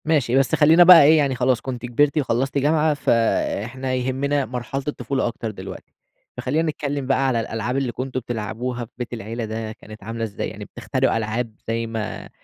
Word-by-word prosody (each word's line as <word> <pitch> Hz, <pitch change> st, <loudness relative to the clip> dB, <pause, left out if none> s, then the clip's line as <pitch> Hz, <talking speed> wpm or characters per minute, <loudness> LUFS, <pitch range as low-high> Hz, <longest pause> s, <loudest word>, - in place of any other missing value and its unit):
ماشي 145 Hz, -6 st, +2 dB
بس 135 Hz, -2 st, +3 dB
خلّينا 160 Hz, +3 st, +6 dB
بقى 175 Hz, -3 st, +10 dB
إيه 155 Hz, +3 st, +6 dB
يعني 140 Hz, -3 st, +1 dB
خلاص 125 Hz, 0 st, +1 dB
كنتِ 125 Hz, -2 st, -5 dB
كبرتِ 140 Hz, +5 st, +2 dB
وخلّصتِ 135 Hz, -1 st, 0 dB
جامعة، 150 Hz, +2 st, +2 dB
فإحنا 120 Hz, 0 st, 0 dB
يهمنا 135 Hz, +2 st, 0 dB
مرحلة 125 Hz, +3 st, -4 dB
الطفولة 140 Hz, -3 st, -1 dB
أكتر 115 Hz, -1 st, -4 dB
دلوقتي، 100 Hz, -, -10 dB, 0.4 s
فخلّينا 155 Hz, +5 st, 0 dB
نتكلّم 145 Hz, -2 st, -4 dB
بقى 135 Hz, 0 st, +2 dB
على 125 Hz, -3 st, +1 dB
الألعاب 115 Hz, +3 st, -3 dB
اللي 135 Hz, -3 st, -1 dB
كنتم 130 Hz, +2 st, -4 dB
بتلعبوها 120 Hz, +1 st, -4 dB
في 115 Hz, -, -25 dB
بيت 125 Hz, -1 st, -5 dB
العيلة 115 Hz, +1 st, -5 dB
ده 110 Hz, 0 st, -5 dB
كانت 110 Hz, -1 st, -12 dB
عاملة 115 Hz, +2 st, -4 dB
إزاي؟ 105 Hz, -2 st, -4 dB
يعني -, -, -9 dB
بتخترعوا -, -, -1 dB
ألعاب 110 Hz, +1 st, -3 dB
زي 115 Hz, 0 st, -1 dB
ما 110 Hz, -2 st, -5 dB
125 Hz, 180 wpm, -22 LUFS, 115-140 Hz, 0.4 s, بقى